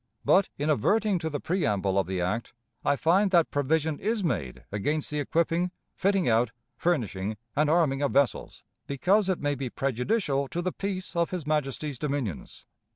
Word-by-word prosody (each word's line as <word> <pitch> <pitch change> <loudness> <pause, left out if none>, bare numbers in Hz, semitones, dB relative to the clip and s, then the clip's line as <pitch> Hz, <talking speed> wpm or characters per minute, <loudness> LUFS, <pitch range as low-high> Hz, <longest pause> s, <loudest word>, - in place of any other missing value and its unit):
But, 195 +1 +4
in 150 +2 +1
adverting 200 - +2
to 160 -1 -2
the 145 -2 -3
preamble 100 - 0
of 95 - 0
the 95 -1 -2
act, 105 +7 -2 0.3
I - - +3
find 185 +8 +3
that 170 -3 +3
provision 150 +2 0
is 215 0 -1
made 70 - -2
against 145 +11 -1
the 150 - -1
equipping, 170 +4 +1 0.3
fitting 195 -2 +1
out, 115 0 +3 0.3
furnishing, 110 - -1 0.2
and 150 +1 +3
arming 155 -4 +2
of 140 - +1
vessels, 140 -1 0 0.2
because 190 +9 +2
it 185 - +1
may 145 0 0
be 135 -2 -4
prejudicial 135 - 0
to 170 - -4
the 185 - 0
peace 190 -2 -4
of 170 -1 +1
his 180 -5 -4
Majesty's 150 -2 -1
dominions. 135 - -4
150 Hz, 170 wpm, -27 LUFS, 130-175 Hz, 0.3 s, But